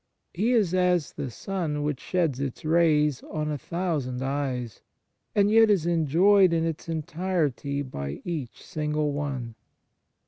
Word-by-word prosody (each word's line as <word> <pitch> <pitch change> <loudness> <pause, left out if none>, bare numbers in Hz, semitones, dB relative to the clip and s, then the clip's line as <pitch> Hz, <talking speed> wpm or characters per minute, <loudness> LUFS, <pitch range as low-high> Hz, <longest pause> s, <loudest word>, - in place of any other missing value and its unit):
He 220 +8 +1
is 205 -7 +2
as 180 -4 +2
the 135 - -4
sun 155 - -3
which 145 -3 -2
sheds 165 -8 0
its 140 +1 -4
rays 155 -4 +3
on 155 -1 -2
a 150 - -2
thousand 145 -6 -2
eyes, 130 -5 -3 0.5
and 205 0 +4
yet 225 0 +6
is 190 -6 +3
enjoyed 175 +4 +4
in 165 0 +1
its 165 0 -4
entirety 155 -4 -1
by 70 - -5
each 155 -9 -5
single 150 -1 -1
one. 140 -5 -3
155 Hz, 140 wpm, -26 LUFS, 140-175 Hz, 0.5 s, yet